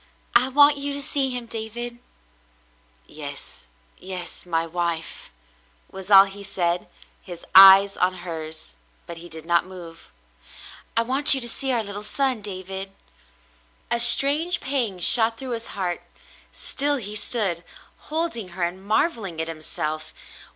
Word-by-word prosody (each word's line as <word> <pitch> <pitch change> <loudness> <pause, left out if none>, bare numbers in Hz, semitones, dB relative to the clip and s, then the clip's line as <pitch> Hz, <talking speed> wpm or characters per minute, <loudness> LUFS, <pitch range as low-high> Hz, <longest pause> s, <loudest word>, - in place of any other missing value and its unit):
"I 250 +2 +4
want 290 +2 +5
you 280 0 -4
to 285 - -5
see 275 -1 -1
him, 250 -2 -5
David." 235 +2 -7 1.1
"Yes, 145 -2 -9 0.3
yes, 180 -2 -7
my 165 -1 -1
wife," 170 -1 -4 0.6
was 190 0 -9
all 195 -1 +9
he 200 +1 -8
said, 180 -3 -2 0.3
his 175 -2 -10
eyes 195 +1 +8
on 185 +1 +1
hers, 160 - -6 0.3
but 170 - -9
he 175 +1 -11
did 160 -1 -10
not 170 +1 +1
move. 175 -3 -12 0.9
"I 230 - +3
want 270 +4 +6
you 265 - -4
to 240 - -1
see 265 +3 -2
our 235 -3 0
little 205 0 -5
son, 255 +2 -1
David." 195 -1 -7 1.0
A 235 - +1
strange 295 +8 +4
pang 255 -8 -2
shot 225 +5 +6
through 260 +1 -7
his 230 -1 -3
heart. 180 -3 -3 0.5
Still 290 +1 -2
he 210 -5 -7
stood, 205 -5 -2 0.5
holding 310 - -2
her 180 - -2
and 180 +2 -4
marvelling 210 - -1
at 160 - -2
himself. 155 -1 -6
200 Hz, 145 wpm, -23 LUFS, 175-245 Hz, 1.1 s, all